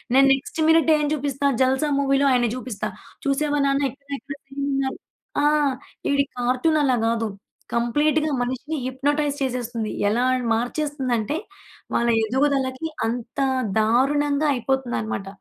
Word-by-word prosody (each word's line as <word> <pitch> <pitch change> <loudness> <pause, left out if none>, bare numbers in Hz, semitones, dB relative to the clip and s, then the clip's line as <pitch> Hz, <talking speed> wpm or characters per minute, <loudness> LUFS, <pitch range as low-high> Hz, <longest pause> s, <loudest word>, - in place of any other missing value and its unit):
నేను 275 +1 +7
నెక్స్ట్ 270 +4 -4
మి‌నిట్టే 320 -1 +5
ఏం - - +1
జూపిస్తా, 285 -1 -2 0.2
'జల్సా' 265 +3 +2
మూవీలో 275 0 +2
ఆయన్ని 245 -2 +3
జూపిస్తా. 245 -5 -4 0.4
చూశావా 290 +1 +1
నాన్న 275 0 +1
ఇతను 280 +1 -8
ఇక్కడ 275 +3 -8
సేమ్ 275 +1 -5
ఉన్నారు. 270 -1 -1 0.5
ఆ! - - +4 0.7
ఈడికి 280 0 +1
కార్టూనలా 260 +2 +2
గాదు. 225 -1 0 0.5
కంప్లీట్‌గా 295 +6 +2
మనిషిని 260 +5 -3
హిప్నోటైజ్ 285 +2 0
చేసేస్తుంది. 240 -4 -2 0.2
ఎలా 240 +4 +1 0.2
న్ - - -4
మార్చేస్తుందంటే, 255 0 -1 0.6
వాళ్ళ 235 0 +2 0.2
ఎదుగుదలకి 265 +3 0 0.2
అంత 235 +3 -4 0.4
దారుణంగా 285 +6 +2
అయిపోతుందనమాట. 245 -6 -2
270 Hz, 120 wpm, -23 LUFS, 245-290 Hz, 0.7 s, నేను